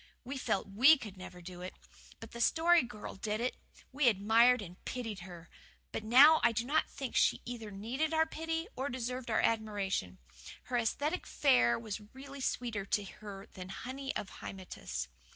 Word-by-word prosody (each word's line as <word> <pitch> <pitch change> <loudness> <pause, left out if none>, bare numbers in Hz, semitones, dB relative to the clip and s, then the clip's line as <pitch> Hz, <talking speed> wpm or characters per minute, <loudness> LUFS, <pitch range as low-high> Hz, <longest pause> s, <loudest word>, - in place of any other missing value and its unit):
We 265 +2 -5
felt 195 -4 -1
WE 255 +11 +6
could 210 -7 -9
never 180 -1 -10
do 180 0 -9
it. 185 - -7 0.4
But 225 - -10
the 235 - -6
Story 335 +7 +5
Girl 230 -4 -7
did 210 +2 -3
it. 250 +2 -1 0.4
We 275 0 +2
admired 230 +4 +5
and 180 -3 -10
pitied 225 -5 -4
her. 175 -2 -10 0.4
But - - -4
now 280 +8 +8
I 235 - +5
do 235 +1 -1
not 305 +4 +1
think 270 -3 -6
that - - +4
she - - +2
either 235 -3 -6
needed 235 +10 -2
our 320 0 +3
pity 325 +1 -3
or 270 +2 -2
deserved 250 0 -4
our 220 - +2
admiration. 205 - -1 0.5
Her 245 - -1
ascetic 290 +9 -1
fare 250 - +4
was 220 -2 -5
really 275 +1 -9
sweeter 235 -5 -2
to 205 - +1
her 200 0 -9
than 185 0 -8
honey 265 +7 -5
of 195 - -5
Hymettus. 185 - -6
230 Hz, 180 wpm, -33 LUFS, 200-270 Hz, 0.5 s, now